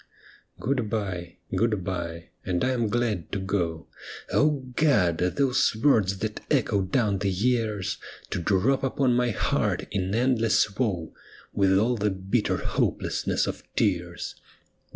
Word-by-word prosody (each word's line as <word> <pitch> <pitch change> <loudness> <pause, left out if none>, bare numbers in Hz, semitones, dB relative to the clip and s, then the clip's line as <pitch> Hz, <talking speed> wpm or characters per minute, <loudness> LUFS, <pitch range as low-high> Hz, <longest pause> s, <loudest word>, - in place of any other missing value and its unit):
' - - -30
Good 125 -3 -1
bye,' 90 -6 -3
' - - -6
Good 110 -5 +1
bye,' 85 -3 -4
' - - -44
and 90 -1 -1
I 130 - +2
am 120 -3 0
glad 110 -6 -1
to 100 - 0
go,' 90 -4 -2 0.5
O 145 -3 +2
God! 105 - +3
those 125 +7 +2
words 110 -6 +3
that 110 +2 -3
echo 115 -8 +2
down 100 +1 +1
the 100 - 0
years, 105 -1 0 0.3
To 90 - -1
drop 105 +10 +2
upon 135 -1 +2
my 125 0 +2
heart 105 - 0
in 95 0 -1
endless 115 -4 +2
woe. 95 -10 -1 0.4
With 95 -1 +3
all 120 +4 +2
the 105 0 +1
bitter 95 +4 0
hopelessness - - 0
of - - -4
tears. 85 -3 -1
105 Hz, 150 wpm, -26 LUFS, 95-120 Hz, 0.5 s, God